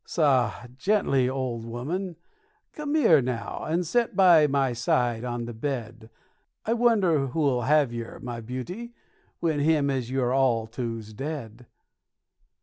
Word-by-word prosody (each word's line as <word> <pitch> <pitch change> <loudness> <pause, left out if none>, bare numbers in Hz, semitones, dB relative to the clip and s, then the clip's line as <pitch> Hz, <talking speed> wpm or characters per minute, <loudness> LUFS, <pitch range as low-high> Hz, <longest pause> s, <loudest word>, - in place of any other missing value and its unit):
Soh! 130 -9 +2 0.3
Gently, 140 -10 +2
old 130 -3 -3
'ooman; 160 +11 -4 0.6
come 300 0 -3
here, 165 - +5
now, 120 -4 -4
and 170 +3 0
set 235 +7 0
by 175 -6 +6
my 135 -3 +1
side 120 -1 0
on 120 -1 -3
the 120 - -6
bed; 115 -2 -5 0.6
I 225 - +1
wonder 200 - +3
who'll 135 -2 +1
have 145 -1 +3
yer, 115 -1 -6
my 120 -1 -6
beauty, 175 - -6 0.5
when 160 -3 +1
him 145 -1 +2
as 130 -3 -2
you're 130 -1 0
all 125 -4 +2
to 115 0 -4
's 110 +1 -13
dead. 125 -3 -6
135 Hz, 145 wpm, -26 LUFS, 120-160 Hz, 0.6 s, by